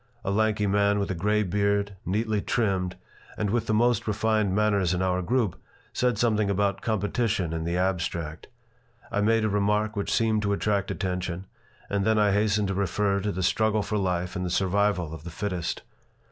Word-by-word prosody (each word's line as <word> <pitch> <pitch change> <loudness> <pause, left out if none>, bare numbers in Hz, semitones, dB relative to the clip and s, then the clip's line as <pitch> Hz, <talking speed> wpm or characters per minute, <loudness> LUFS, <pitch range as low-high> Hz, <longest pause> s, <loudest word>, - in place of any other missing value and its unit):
A 95 - 0
lanky 110 0 +1
man 100 +1 +2
with 100 -1 -1
a - - 0
gray 105 +5 +1
beard, 100 +1 0
neatly 105 +2 0
trimmed, 95 -6 0 0.4
and 105 -2 -1
with 115 0 0
the 110 - +1
most 115 0 +2
refined 110 -2 +1
manners 100 -4 +2
in 90 - 0
our 90 0 +1
group, 110 0 0 0.3
said 125 -3 +1
something 110 -2 +2
about 100 0 0
competition 105 -4 0
in 80 0 -3
the 85 +1 -1
abstract. 85 -4 -2 0.6
I 105 -2 0
made 115 +1 +3
a - - +3
remark 105 +1 +1
which 100 - -2
seemed 110 -2 +2
to 100 -1 0
attract 100 -1 0
attention 90 -1 -3 0.4
and 100 -1 0
then 110 +1 +2
I 105 -1 +4
hastened 105 0 +1
to - - 0
refer 100 +1 0
to 105 +1 -2
the 95 -1 -3
struggle 110 +3 +2
for 105 +1 -1
life 90 -2 -1
and 90 - -2
the 90 - -2
survival 95 -2 +1
of 80 - -9
the 85 - -7
fittest. 90 0 -3
100 Hz, 190 wpm, -26 LUFS, 95-105 Hz, 0.6 s, I